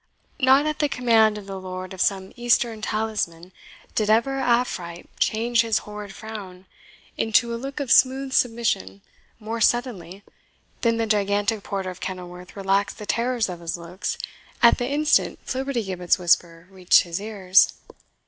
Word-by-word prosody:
Not 265 +2 +5
at 305 0 -2
the 295 -1 +1
command 225 -5 +3
of 205 - -9
the 195 -1 -6
lord 185 0 -7
of 185 - -5
some 190 -1 0
Eastern 240 -2 +1
talisman 210 -6 -3 0.4
did 215 -1 0
ever 235 +5 +2
Afrite 235 -9 -1
change 230 +2 +2
his 225 -2 +1
horrid 210 -1 -8
frown 195 -4 -9 0.5
into 235 +2 +2
a 230 - -5
look 275 +2 -6
of 275 -5 -3
smooth 265 +1 +4
submission 225 - 0 0.4
more 225 +1 -5
suddenly 205 -6 0 0.6
than 230 -1 +2
the 230 - 0
gigantic 205 0 0
porter 195 -2 -4
of 180 - -12
Kenilworth 180 -1 -7
relaxed 195 +1 0
the 210 - -8
terrors 235 +1 0
of 180 -2 -7
his 170 0 -4
looks 175 +3 -5 0.5
at 235 - +6
the 245 - -1
instant 295 +1 +2
Flibbertigibbet's 225 -10 -1
whisper 170 -1 +1
reached 185 -2 +4
his 175 +1 -5
ears. 200 -3 +3
210 Hz, 150 wpm, -23 LUFS, 185-235 Hz, 0.6 s, at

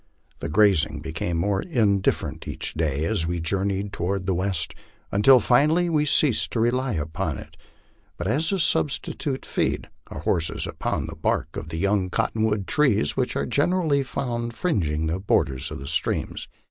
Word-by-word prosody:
The - - -4
grazing 80 -5 +3
became 80 +2 -3
more 95 +3 +1
indifferent 105 - 0
each - - -4
day 80 -2 0
as 80 0 0
we 85 0 -1
journe3 95 +4 0
r 100 0 -1
ed 100 - -10
toward 95 +2 -2
the 95 - +1
west, 90 -2 -1 0.4
until 125 +6 +6
finally 155 +9 +3
we 150 -2 +2
ceased 145 -4 +3
to 115 - 0
rely 125 +2 +1
upon 80 -2 -2
it, - - -11 0.6
but 85 - -4
as 140 - +1
a 195 - +1
substitute 145 -4 -1
fed - - -1 0.2
our - - -7
horses 80 -2 0
upon - - -2
the - - -7
bark 80 - -1
of 80 - -6
the 80 - -4
young 100 +1 +1
cotton 110 - -1
wood 105 -3 0
trees 120 - +2
which - - -1
are 70 - 0
generally 150 - +2
found 120 -3 -3
fringing 80 - 0
the 80 +3 -1
borders 70 -9 +1
of - - -6
the 70 - -8
streams. 80 +2 -1
100 Hz, 175 wpm, -24 LUFS, 80-130 Hz, 0.6 s, until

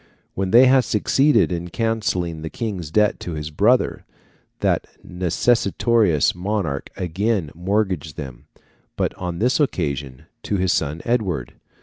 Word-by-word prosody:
When 95 0 -2
they 120 +6 +7
had 130 0 +5
succeeded 135 +4 +2
in 85 0 -3
cancelling 95 -7 -1
the 80 - -5
King's 95 -4 -4
debt 105 +5 +2
to 85 - -5
his 75 0 -5
brother, 110 +11 +2 0.6
that - - +1 0.2
necessitous 100 - +2
monarch 90 -6 -3
again 95 -1 -1
mortgaged 90 -4 -1
them, 65 -5 -8 0.5
but - - -1
on 90 -2 -5
this 125 - +1
occasion 70 - -2 0.2
to 100 - -2
his 95 -1 +1
son 75 +4 -2
Edward. 105 - -1
95 Hz, 130 wpm, -21 LUFS, 80-110 Hz, 0.6 s, they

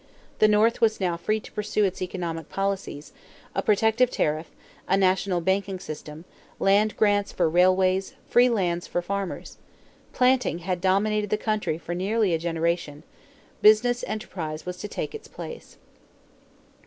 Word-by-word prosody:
The 215 - +6
North 215 +3 +3
was 220 -1 +3
now 180 -3 0
free 215 +6 -1
to - - -13
pursue 210 0 -1
its 190 -1 -3
economic 170 -3 -4
policies: 195 -6 -3 0.4
a - - 0
protective 220 +3 +3
tariff, 155 -6 -1 0.4
a 190 - +3
national 185 -1 +1
banking 190 +2 0
system, 155 -2 -8 0.3
land 205 +2 +3
grants 205 -1 +2
for 175 - +1
railways, 185 +3 +2
free 245 +1 +5
lands 175 -6 -1
for 175 - -2
farmers. 200 0 -5 0.5
Planting 250 -7 +2
had 180 0 -2
dominated 205 +2 +1
the 210 - +1
country 215 -7 -1
for 170 +1 -6
nearly 200 +2 +1
a 165 - +1
generation. 165 -2 -2 0.6
Business 240 +3 +5
enterprise 165 -8 -5
was 180 0 -5
to 205 - -6
take - - -5
its 445 - -9
place. 475 - -10
190 Hz, 145 wpm, -25 LUFS, 175-215 Hz, 0.6 s, The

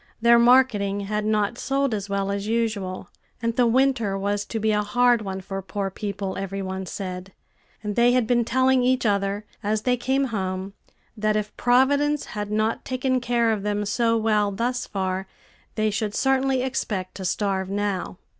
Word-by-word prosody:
Their 235 +1 +6
marketing 235 -5 +4
had 210 +1 -2
not 215 +2 0
sold 275 -2 0
as 205 -1 -3
well 200 0 -1
as 200 +1 -3
usual, 215 -5 -2 0.3
and 230 -1 -1
the 245 -1 +4
winter 235 -5 +2
was 205 +1 -1
to 225 - -4
be 220 0 +1
a 210 0 +2
hard 245 +2 +3
one 190 -2 -5
for 195 +1 -5
poor 195 0 -4
people, 200 -1 -4
every 195 0 -4
one 190 0 -4
said; 185 -1 -6 0.5
and 210 -1 -3
they 240 +1 +4
had 250 -2 +3
been 240 +1 +2
telling 260 +2 +3
each 255 0 +1
other, 200 0 0 0.2
as 215 0 -1
they 250 -1 +2
came 265 +3 +1
home, 190 -1 -3 0.4
that 215 -1 0
if 210 0 -2
Providence 280 +4 +2
had 210 -1 -4
not 215 +1 0
taken 255 0 -1
care 235 -2 +2
of 215 -2 -1
them 205 0 -1
so 230 +2 +1
well 215 -2 +2
thus 245 +5 -2
far, 190 -1 -2 0.5
they 215 -1 +1
should 210 0 -2
certainly 265 -1 +2
expect 210 -8 -3
to 190 - -7
starve 190 0 -1
now. 200 -3 -2
215 Hz, 180 wpm, -24 LUFS, 200-245 Hz, 0.5 s, Their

